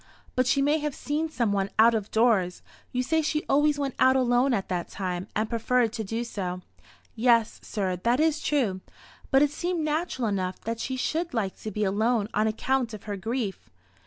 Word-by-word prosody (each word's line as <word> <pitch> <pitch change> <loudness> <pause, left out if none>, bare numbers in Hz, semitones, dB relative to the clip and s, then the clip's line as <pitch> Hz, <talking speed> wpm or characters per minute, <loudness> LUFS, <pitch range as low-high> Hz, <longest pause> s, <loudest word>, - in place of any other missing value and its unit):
But 255 -1 +2
she 275 +1 +3
may 295 +2 +2
have 300 -2 -3
seen 305 +3 -2
some 235 -8 0
one 195 -1 0
out 230 +2 +6
of 215 -2 -2
doors. 215 -6 +2 0.3
You 250 0 0
say 320 +4 +1
she 305 0 -1
always 295 +1 +3
went 275 -2 -2
out 260 0 +5
alone 250 +1 +3
at 200 -6 0
that 180 -2 -2
time, 185 -1 -4
and 215 +1 +1
preferred 230 0 +1
to 225 -2 -3
do 225 +4 -3
so." 185 -6 -4 0.5
"Yes, 230 -1 +2
sir, 190 -3 -2
that 235 +8 +1
is 315 -1 +2
true. 225 -11 0 0.5
But 270 +1 +5
it 290 - +2
seemed 345 +2 -2
natural 305 -5 -1
enough 185 -3 -2
that 230 +1 -4
she 260 +2 -3
should 320 +3 -2
like 200 -4 -1
to 215 - -5
be 210 +1 -2
alone 215 +2 +1
on 215 +1 +2
account 235 +1 0
of 210 - -11
her 205 -2 -4
grief." 220 0 -4
235 Hz, 200 wpm, -27 LUFS, 205-275 Hz, 0.5 s, out